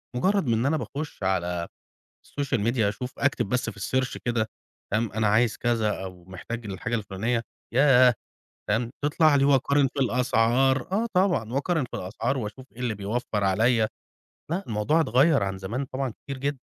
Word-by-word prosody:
مجرد 190 +4 +1
إن 115 +1 +1
أنا 155 +3 +2
باخش 145 -7 -6
على 90 -2 0 0.6
الSocial 140 -3 -2
Media، 120 +1 0
أشوف، 110 +5 -2
أكتب 140 -7 +1
بس 125 0 0
في 100 -2 -13
الSearch 130 +5 -1
كده، 115 -2 0 0.4
تمام، 110 0 0
أنا 110 0 0
عايز 110 +1 +3
كذا 115 -3 +1
أو 90 -2 -9
محتاج 110 +5 -7
الحاجة 105 +4 -4
الفلانية، 110 +2 -1 0.3
ياه، 130 -2 +6 0.6
تمام، 115 +3 0
تطلع 150 0 +4
لي. 140 - +4
وأقارن 140 0 +3
في 140 - -4
الأسعار، 125 - +2
آه 220 +4 +1
طبعًا، 175 - +1
وأقارن 150 +1 0
في - - -7
الأسعار 115 +8 -2
وأشوف 115 +3 -6
إيه 120 - -15
اللي 120 -3 -1
بيوفر 105 +1 -2
عليَّ 110 +3 +3 0.6
لأ، 185 +4 -1
الموضوع 110 +9 +1
اتغير 140 0 +4
عن 95 -1 -2
زمان 115 +9 -3
طبعًا 135 0 -3 0.2
كتير 140 -2 -5
جدًا. 140 0 -2
120 Hz, 165 wpm, -26 LUFS, 105-135 Hz, 0.6 s, ياه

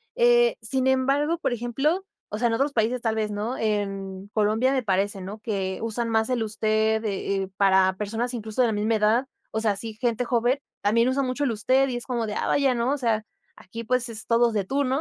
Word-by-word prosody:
Eh, 480 0 +4
sin 260 -1 0
embargo, 275 +5 +2
por - - -1
ejemplo, 270 - -1 0.2
o 210 - -4
sea, 240 +2 +2
en 230 - 0
otros 275 +5 0
países, 235 +1 0
tal 225 -2 0
vez 215 -1 -1
no. 215 +5 -3
En 195 -3 -2
Colombia 220 +4 +2
me 265 -2 0
parece, 195 -1 0
¿no?, 195 +3 -7
que 195 -3 -3
usan 230 +1 -2
más 220 0 +1
el 245 -3 0
usted, 220 0 +1
eh, 195 -2 -2
para 190 -1 +4
personas 225 +4 -2
incluso 220 0 -2
de 245 - +4
la 225 - 0
misma 215 +2 +1
edad. 220 +4 +2 0.3
O 220 - -1
sea, 220 -1 +2
así, 215 +2 -5
gente 235 0 0
joven, 240 +3 +1 0.2
también 230 +4 +3
usan 270 +1 0
mucho 255 +3 -2
el 270 - +1
usted 260 +5 +2
y 250 - -3
es 240 - -6
como 240 -3 -2
de, 210 - -4
ah - - -1
vaya, 275 -3 +2
¿no? 235 +2 0
O - - -1
sea, 225 -5 0 0.3
aquí, 230 +5 -8
pues 250 +2 0
es 220 -1 -6
todos 235 0 +3
de 205 -2 0
tú, 275 +9 0
¿no?, 260 +2 0
230 Hz, 230 wpm, -25 LUFS, 210-255 Hz, 0.3 s, Eh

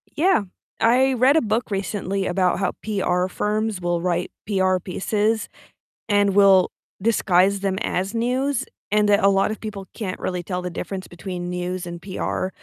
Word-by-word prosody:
Yeah. 350 - +3 0.4
I 260 +3 +4
read 260 +4 +4
a - - +4
book 220 +1 -1
recently 195 -1 -2
about 180 0 +1
how 195 - +1
PR 185 -4 0
firms 210 +1 -1
will 175 -1 -1
write 175 0 -1 0.2
PR 190 -2 +2
pieces 210 +4 -1 0.6
and 205 -2 +2
will 195 -2 +6 0.3
disguise 195 -2 +3
them 195 -1 -1
as 190 +3 -1
news, 255 +3 0 0.3
and 210 0 +3
that 205 0 +4
a 195 - +6
lot 195 +1 +2
of 215 - -5
people 205 -3 -7
can't 195 -5 -4
really 180 -1 -3
tell 180 +1 -3
the 180 - -4
difference 185 +2 -5
between 175 0 -6
news 180 0 -3
and 170 0 -6
PR 185 -1 -2
195 Hz, 165 wpm, -23 LUFS, 180-215 Hz, 0.6 s, will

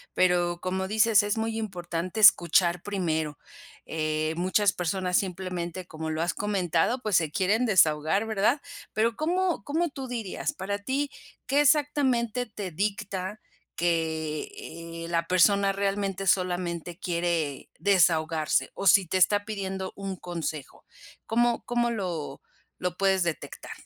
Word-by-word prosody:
pero 175 -1 +2
como 190 +1 -2
dices 220 0 +4
es 205 +2 -1
muy 225 0 -2
importante 180 -1 -4
escuchar 175 -3 +5
primero. 160 -7 -2 0.5
Eh, 155 0 -1
muchas 185 +2 +2
personas 180 +1 0
simplemente 180 -1 -4
como 160 0 -6
lo 155 +1 -2
has 175 - 0
comentado 195 +3 0
pues 210 -4 0
se 160 -3 +1
quieren 210 +8 +1
desahogar, 160 +1 +3
¿verdad? 220 +6 +1 0.3
Pero, 225 +1 +1
¿cómo 350 +4 0
cómo 325 +3 0
tú 270 -2 -7
dirías?, 230 -6 -3
para 200 +2 -4
ti, 275 +6 -2 0.3
¿qué 280 +3 +3
exactamente 265 -5 +2
te 205 -4 -6
dicta 200 +2 -3 0.4
que, 160 -2 -1 0.6
eh, - - -7
la 170 -1 0
persona 195 +3 +4
realmente 195 -1 -2
solamente 175 -1 0
quiere 170 -5 -2
desahogarse? 165 -5 +2
O 200 - -5
si 185 0 +6
te 185 - 0
está 205 +2 +4
pidiendo 190 -3 -4
un 195 -1 -5
consejo, 165 -5 -6 0.4
¿cómo 240 +1 +1
cómo 240 0 +1
lo 175 -10 -4 0.4
lo 180 -1 -3
puedes 190 -2 +2
detectar? 170 -2 -5
190 Hz, 135 wpm, -27 LUFS, 170-215 Hz, 0.6 s, si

